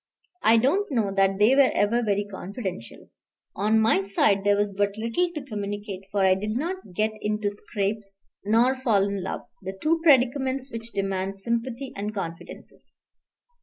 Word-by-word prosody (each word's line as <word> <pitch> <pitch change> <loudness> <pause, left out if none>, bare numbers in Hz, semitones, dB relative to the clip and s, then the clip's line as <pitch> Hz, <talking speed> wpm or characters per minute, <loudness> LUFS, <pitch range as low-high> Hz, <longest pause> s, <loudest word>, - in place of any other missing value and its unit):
I 225 +1 +5
don't 315 - +1
know 215 -6 0
that 195 0 +2
they 215 +6 +5
were 275 -2 +6
ever 225 +4 +2
very 205 -2 0
confidential. 190 - -7 0.4
On 215 +3 +2
my 220 -3 +3
side 195 0 +1
there 205 0 +4
was 205 -1 0
but 200 +1 -1
little 230 +11 0
to 300 - -4
communicate, 205 -3 -5
for 200 -2 +2
I 190 - +6
did 210 +4 -2
not 335 - -5
get 215 +3 +1
into 210 -1 -1
scrapes 205 0 -4 0.3
nor 230 +5 +3
fall 230 -7 +2
in 200 -1 -2
love, 185 - -4 0.2
the 190 0 -6
two 330 +6 +1
predicaments 265 -2 +3
which 230 0 -7
demand 195 -1 -2
sympathy 235 +5 -3
and 210 +2 -4
confidences. 170 -4 -8
210 Hz, 165 wpm, -25 LUFS, 195-240 Hz, 0.4 s, were